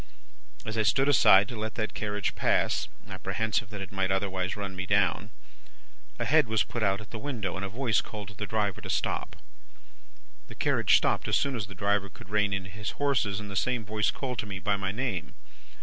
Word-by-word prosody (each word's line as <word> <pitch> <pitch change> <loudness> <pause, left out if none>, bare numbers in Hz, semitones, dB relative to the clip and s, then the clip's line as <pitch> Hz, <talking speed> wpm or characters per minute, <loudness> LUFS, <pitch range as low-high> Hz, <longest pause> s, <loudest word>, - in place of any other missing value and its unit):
As 110 +1 -2
I - - +5
stood 135 +6 +3
aside 100 -8 +7
to 120 - -6
let 110 0 -4
that 110 -2 -2
carriage 105 -1 -2
pass, - - +1 0.2
apprehensive 110 -3 -1
that 105 -2 -7
it 95 - -9
might 95 -1 0
otherwise 95 -1 -1
run 100 -2 -5
me 95 +1 -4
down, 100 +1 +2 0.9
a - - -2
head 155 -2 +4
was 110 0 +2
put 120 - -5
out 100 -1 +2
at 105 - -13
the 110 - -5
window, 115 -8 -3
and 95 - -4
a 100 - -2
voice 115 -1 +1
called 105 -2 -8
to - - -11
the 105 0 -5
driver 105 -3 -1
to - - -7
stop. - - -1 1.1
"The - - -11
carriage - - +4
stopped - - 0
as - - +3
soon 140 -2 0
as 105 -4 -3
the 100 - -10
driver 100 +1 +1
could 95 - -14
rein 105 -1 +2
in 95 -1 -2
his 105 +3 -5
horses, 120 -8 +1
and 105 -2 -7
the - - -6
same 125 +3 0
voice 105 +1 +1
called 125 -4 -3
to 105 - -2
me 100 -1 -4
by 100 +1 0
my 95 -1 -2
name. 115 -5 -3
105 Hz, 215 wpm, -29 LUFS, 100-110 Hz, 1.1 s, aside